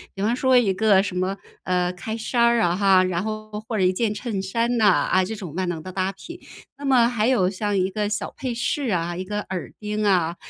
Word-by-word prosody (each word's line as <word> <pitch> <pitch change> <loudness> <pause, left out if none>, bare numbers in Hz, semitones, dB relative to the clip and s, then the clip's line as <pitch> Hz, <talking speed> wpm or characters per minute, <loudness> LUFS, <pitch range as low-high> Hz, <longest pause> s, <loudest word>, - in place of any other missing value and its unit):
比 195 - -4
方 230 +3 +1
说 260 0 +3
一 210 -6 +3
个 200 -1 +4
什 185 -2 -4
么， 185 +2 -1 0.3
呃， 180 0 0
开 220 +5 -5
衫 235 +2 -1
儿 235 0 +4
啊 175 -3 +2
哈， 190 -1 +4
然 185 0 -1
后 215 0 -5 0.2
或 225 - -1
者 190 - +1
一 185 0 +3
件 220 +2 0
衬 210 -2 -3
衫 230 +5 -1
呢， 215 - +4
啊， 185 0 +3
这 220 +4 -4
种 180 -7 -8
万 185 +1 -2
能 165 -3 -4
的 185 - -7
搭 190 +1 -1
品。 335 - -11 0.4
那 285 - -6
么 250 -4 +4
还 230 -2 0
有 245 -8 +3
像 205 +1 -2
一 185 0 +1
个 210 +1 -1
小 210 - -3
配 255 -2 -4
饰 280 +5 -1
啊、 175 -3 -1
一 185 - -4
个 210 +2 -3
耳 185 -2 -4
钉 210 0 -3
啊， 180 -4 +2
200 Hz, 265 characters per minute, -23 LUFS, 185-225 Hz, 0.4 s, 个